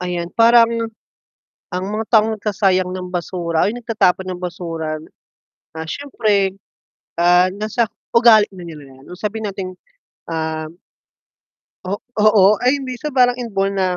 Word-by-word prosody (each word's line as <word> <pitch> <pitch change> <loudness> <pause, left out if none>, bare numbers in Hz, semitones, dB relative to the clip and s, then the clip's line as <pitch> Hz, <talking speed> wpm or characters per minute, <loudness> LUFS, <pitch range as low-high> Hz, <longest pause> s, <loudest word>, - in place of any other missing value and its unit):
ayan 175 -1 -3
parang, 230 0 +4 0.8
ang 180 +1 -2
mga 215 +2 -2
taong 220 0 +4
nagsasayang 195 -3 +1
ng 185 0 -5
basura, 170 -2 -1
ay 215 - -3
nagtatapon 220 -6 +1
ng 180 - -8
basura, 165 -3 -4 0.8
ah, 160 0 -5
siyempre, 210 - 0 0.6
ah, 180 +1 +5
nasa 215 +3 0 0.3
ugali 230 -3 +7
na 180 - -9
nila 155 -3 -10
'yan, 135 - -17
o - - -8
sabihin 220 +2 -4
nating, 190 -2 -6 0.6
um 160 0 -4 1.1
o 185 - -4 0.3
oo, 210 -3 +6 0.2
ay 255 +3 +3
minsan 265 +2 -5
parang 250 -2 +4
inborn 200 -5 -2
na 190 -1 +1
195 Hz, 135 wpm, -19 LUFS, 180-225 Hz, 1.1 s, ugali